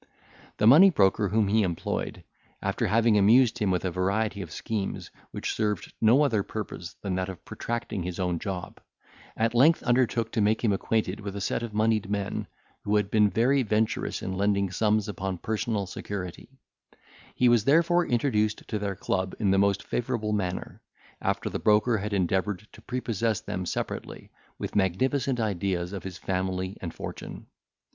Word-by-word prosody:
The 105 - +1
money 155 - +9
broker 100 - +2
whom 105 +1 +2
he 110 +2 +3
employed, 90 -4 -3 0.4
after 100 +4 -1
having 110 +1 +4
amused 120 +4 +5
him 105 -3 +1
with 90 -1 0
a 90 - 0
variety 100 +3 -1
of 90 - -7
schemes, 105 +2 -4 0.2
which - - -3
served 105 -3 -2
no 120 +7 +5
other 115 -8 +2
purpose 100 -4 -6
than 100 -2 -2
that 95 +1 -1
of 95 - -9
protracting 115 -4 -4
his 90 +1 -5
own 90 -2 0
job, 95 -2 -6 0.6
at 115 +1 +1
length 145 +8 +5
undertook 120 -2 +1
to 110 - 0
make 105 +3 +2
him 110 -4 +3
acquainted 105 -1 -1
with 100 -1 -6
a - - -3
set 100 - -1
of 115 -3 -6
monied 110 -2 +1
men 100 -1 -2 0.4
who 105 - +1
had 105 -1 +1
been 105 -1 +4
very 125 +8 +2
venturous 110 -1 -1
in 95 - -3
lending 100 0 +1
sums 105 +1 +1
upon 95 -2 -3
personal 110 +1 -2
security; 95 0 -6 0.9
he 125 - +3
was 120 -3 +4
therefore 170 +4 +4
introduced 110 -4 0
to 105 - -1
their 100 -1 -2
club 95 +1 -2
in 100 -4 +2
the 95 - +3
most 100 0 +2
favourable 115 -3 -2
manner, 95 -3 -3 0.4
after - - -1
the - - -3
broker 110 +2 +3
had 105 +2 -4
endeavoured 95 +2 0
to - - -15
prepossess 115 -3 -1
them 90 -1 -4
separately, - - -5 0.3
with - - -5
magnificent 125 - +1
ideas 95 -4 -1
of 100 - -4
his 95 -2 -7
family 95 +1 -2
and 85 - -4
fortune. - - -8
105 Hz, 170 wpm, -27 LUFS, 95-115 Hz, 0.9 s, money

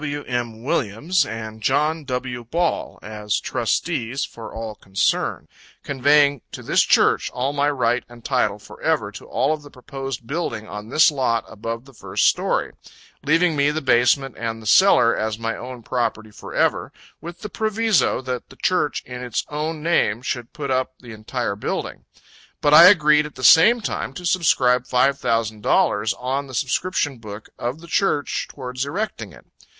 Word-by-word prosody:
W. 145 -1 -4
M. 120 -2 -4
Williams, 150 - 0
and 110 -1 -7
John 155 +7 +1
W. 125 -2 -4
Ball, 165 +8 -2
as 105 -1 -2
trustees 125 +4 -1
for 115 - -10
all 110 -1 -6
concerned, 100 -1 -1 0.4
conveying 140 0 +3
to - - -7
this - - +3
Church - - +3
all 130 +3 -2
my 145 0 +1
right 125 -3 0
and 120 -1 -15
title 115 -6 +1
forever 105 - -2
to - - -11
all 145 +3 +1
of 155 - -5
the 145 - -13
proposed 135 -2 -7
building 120 -7 -4
on 105 +1 -8
this 155 +4 +5
lot 125 -5 0
above 115 +3 -6
the 135 - -17
first - - -1
story: - - +1 0.5
leaving 165 +3 +3
me 140 0 +3
the 150 +1 -1
basement 130 0 +2
and 115 -1 -3
the 110 - -13
cellar 120 - +5
as 110 0 -2
my 115 0 -3
own 125 -1 -8
property 110 -3 -2
forever, - - -1 0.3
with 170 +2 -9
the 210 - -6
proviso, 220 - +1
that 125 -2 -5
the - - -14
Church 180 -6 0
in 125 0 -7
its 125 -3 -2
own 150 +1 -4
name 125 -9 +1
should 120 -3 -4
put 140 -3 -5
up 130 0 0
the 120 -2 -12
entire 110 0 -3
building. 105 - -4 0.5
But 145 - +2
I 165 +3 +10
agreed 150 -5 +5
at 150 - -16
the 130 - -9
same 215 - +7
time - - -3
to 180 - -8
subscribe 130 -8 +2
five 135 +2 +2
thousand 110 -2 -1
dollars 105 +1 +2
on 135 +3 -3
the 130 - -8
subscription 140 +1 -1
book 105 -1 -10
of 125 +6 -4
the 170 - -12
Church 165 -4 0
towards 125 -1 -5
erecting 195 +10 -4
it. - - -16
130 Hz, 170 wpm, -22 LUFS, 115-150 Hz, 0.5 s, I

